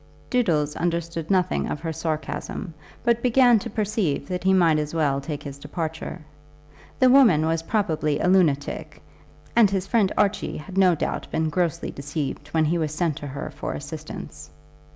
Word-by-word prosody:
Doodles 160 - +1
understood 170 -1 -2
nothing 185 -2 +1
of - - -3
her 165 -1 -3
sarcasm, 160 +2 -4 0.3
but 235 -1 +2
began 245 -1 +5
to - - -6
perceive 205 -9 -1
that 180 -1 -3
he 190 - +4
might 170 -5 +4
as 150 +1 -3
well 140 -4 +1
take 145 +1 -5
his 140 -1 -8
departure. 160 +3 -5 0.8
The 255 -1 +5
woman 225 - +6
was 160 0 0
probably 160 -6 0
a - - +1
lunatic, 165 -7 +1 0.6
and 230 -4 +6
his 190 -1 -1
friend 200 -2 +2
Archie 205 0 +1
had 180 +5 -9
no 185 -3 +5
doubt - - -3
been 160 0 0
grossly 170 -1 -1
deceived 145 0 -4
when 160 +1 +1
he 170 +3 +1
was 155 -2 -1
sent 165 -3 0
to 145 - -6
her 140 +2 -6
for 145 - -5
assistance. 155 +1 -8
165 Hz, 170 wpm, -24 LUFS, 150-195 Hz, 0.8 s, woman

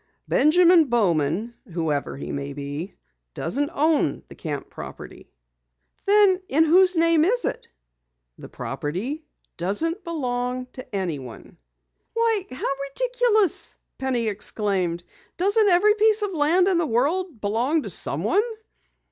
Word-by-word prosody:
"Benjamin 340 +2 +5
Bowman 200 - 0 0.2
whoever 155 -5 -2
he - - -6
may 140 0 -4
be 145 +5 -6 0.4
doesn't 280 - -2
own 305 - +1
the - - -10
camp 145 -3 -5
property." - - -10 0.8
"Then 400 -2 +5
in 310 +4 +4
whose 360 +2 +4
name 330 -1 +4
is 485 +8 +1
it?" - - -4 0.7
"The - - -10
property 225 - -4 0.3
doesn't 320 - -2
belong 250 -6 -3
to 255 -5 -8
anyone." 150 - -5 0.6
"Why, 455 -4 +1
how 255 - -4 0.2
ridiculous!" 485 - +1 0.2
Penny 250 -4 -1
exclaimed. 195 -4 -1 0.3
"Doesn't 405 +3 +3
every 390 +4 +5
piece 430 0 +3
of 410 - -1
land 335 +4 +3
in 370 -3 +2
the 330 - 0
world 290 - 0
belong 240 +10 0
to - - -3
someone?" 410 - +2
290 Hz, 120 wpm, -24 LUFS, -, 0.8 s, Benjamin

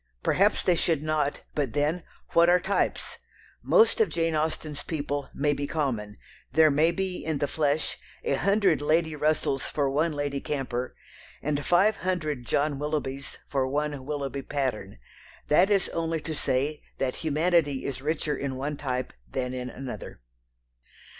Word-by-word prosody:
Perhaps 205 +3 +3
they 180 - +4
should 165 -3 +1
not, 155 -2 0
but 140 -6 -1
then, 150 +4 +1 0.3
what 170 +1 +6
are 180 +1 +6
types? 195 +2 -1 0.4
Most 455 0 +4
of 440 - +4
Jane 165 -1 0
Austen's 155 -1 -2
people 145 -3 -3
may 145 +1 +1
be 145 0 -3
common; 115 -10 -2 0.3
there 155 +2 +6
may 155 +4 +4
be, 185 +1 -2
in 160 -2 -1
the 145 - 0
flesh, 150 0 0 0.2
a - - +1
hundred 195 +1 +3
Lady 160 +1 +2
Russells 150 -2 +1
for 140 -2 0
one 155 +4 +2
Lady 145 -1 -2
Camper, 130 -3 -3 0.5
and 145 0 0
five 195 +7 +4
hundred 155 -9 -2
John 145 -1 +1
Willoughbys 140 -2 -3
for 135 -2 0
one 145 -1 -1
Willoughby 140 -1 -3
Patterne. 130 - -3 0.5
That 175 +6 +5
is 200 -3 +3
only 165 -1 -1
to 160 - -4
say 145 +1 0 0.2
that 130 -1 -1
humanity 160 -2 +1
is 130 -1 -3
richer 150 0 -1
in 135 -1 -3
one 140 +3 -3
type 130 -3 -3 0.2
than 125 -1 -2
in 125 0 -4
another. 130 +1 -7
150 Hz, 155 wpm, -27 LUFS, 135-160 Hz, 0.5 s, what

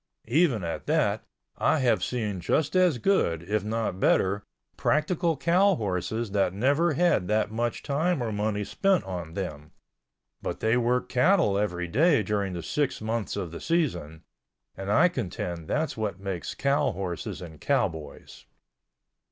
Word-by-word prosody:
Even 145 - +3
at 85 - -4
that - - +1 0.3
I - - +3
have 120 -6 +2
seen 105 -6 -2
just 145 - 0
as 180 -7 +4
good, 100 - +1
if 105 +3 -1
not 110 -3 -2
better, 100 +1 +2 0.3
practical 160 +1 +1
cow 185 +6 +3
horses 100 - -2
that 95 -2 +1
never 140 +9 +2
had 165 - +2
that 105 0 +1
much 120 +1 -2
time 160 +4 0
or 115 - -2
money 105 0 -1
spent 195 - +1
on 85 -4 -6
them—but 75 -8 -8
they 110 +2 +2
worked 125 +1 +1
cattle 160 - +3
every 90 -4 -1
day 140 - +3
during 100 -1 -1
the 85 -2 -5
six 145 -3 -1
months 110 0 -2
of 85 - -4
the 85 - -8
season—and 85 - -4
I 160 +11 +6
contend 90 - -4
that's 155 +1 -1
what 105 -4 -3
makes 95 -3 -4
cow 140 0 +1
horses 90 -2 -4
and 80 -4 -10
cowboys. 85 - -2
110 Hz, 145 wpm, -27 LUFS, 90-145 Hz, 0.3 s, I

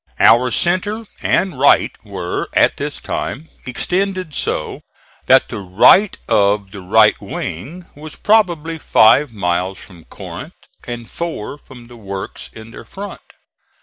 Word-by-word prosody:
Our 120 +3 +5
centre 195 - 0 0.2
and 185 -9 0
right 140 - +4
were, 95 -4 -4
at - - +3
this - - -4
time, 160 +3 -5 0.2
extended 185 +5 -2
so - - -3 0.5
that 130 +1 +5
the 115 - -5
right 100 - +4
of 100 -2 +2
the 100 - -9
right 90 - +4
wing 145 - -6
was 155 +1 -10
probably 170 -7 +1
five 135 +2 +4
miles 90 -2 -1
from 90 -4 -15
Corinth - - -9 0.3
and 120 -1 -6
four 160 -5 -5
from 125 -4 -14
the 120 0 -14
works 100 -3 -7
in 110 0 -12
their - - -10
front. 200 +1 -8
125 Hz, 135 wpm, -18 LUFS, -, 0.5 s, Our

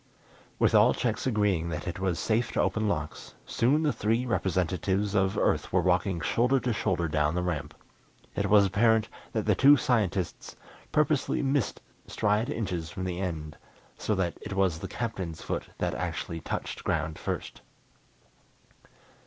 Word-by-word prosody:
With - - +3
all - - +6
checks - - -1
agreeing 100 -8 +1
that 75 0 -4
it 90 +1 -4
was 95 -3 0
safe 115 +1 0
to - - -1
open 110 -1 0
locks, 75 -6 -4
soon 140 +7 +2
the 150 - +2
three 115 +4 0
representatives 95 -1 0
of 95 -2 +1
Earth - - +1
were 90 - +3
walking 90 0 +1
shoulder 125 +9 +2
to 125 - 0
shoulder 90 -5 0
down 75 0 +1
the 90 - 0
ramp. 80 -4 -3 0.6
It 100 -1 0
was 100 0 +6
apparent 110 +3 +3 0.2
that 110 -2 -1
the 105 - +4
two 140 +8 +7
scientists 105 -8 -1 0.4
purposely 150 -2 +1
missed 135 -2 0 0.3
stride 105 +3 0
inches 90 -7 -3
from 95 - -6
the 90 -1 -3
end, 80 -5 -4 0.4
so 105 - -1
that 90 -3 0
it - - -6
was 95 -4 +1
the - - -5
Captain's 95 -9 -4
foot - - -4
that - - -1
actually 85 - -3
touched - - -4
ground 80 -1 -1
first. - - -5
95 Hz, 160 wpm, -28 LUFS, 85-110 Hz, 0.6 s, two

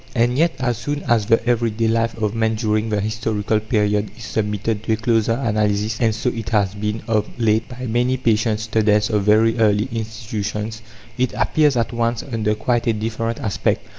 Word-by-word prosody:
And 120 +1 +2
yet, 165 +4 +2
as 120 -3 -1
soon 145 0 -3
as 115 -5 +1
the 115 +1 +2
every 120 -1 +2
day 115 +1 -1
life 115 0 0
of 105 -2 -1
man 110 -1 +1
during 110 0 0
the 105 -1 0
historical 110 0 -1
period 105 -1 0
is 115 - -10
submitted 105 0 -2
to 110 - 0
a - - 0
closer 115 0 +1
analysis 110 -2 0
and 110 -2 +2
so 125 +2 -1
it 115 -5 -5
has 100 -2 +1
been, 105 +1 -3
of 110 -2 +1
late, 110 0 +1
by 125 0 -7
many 125 +2 +1
patient 110 -3 +1
students 110 -1 +2
of 105 -1 +2
very 110 +2 +4
early 105 +1 +3
institutions 110 -1 -4 0.4
it 130 -1 +1
appears 130 +6 +2
at 115 0 -1
once 115 0 -1
under 110 -5 -1
quite 120 +2 0
a 115 - +3
different 115 +1 -3
aspect. 105 - -1
110 Hz, 195 wpm, -20 LUFS, 105-115 Hz, 0.4 s, very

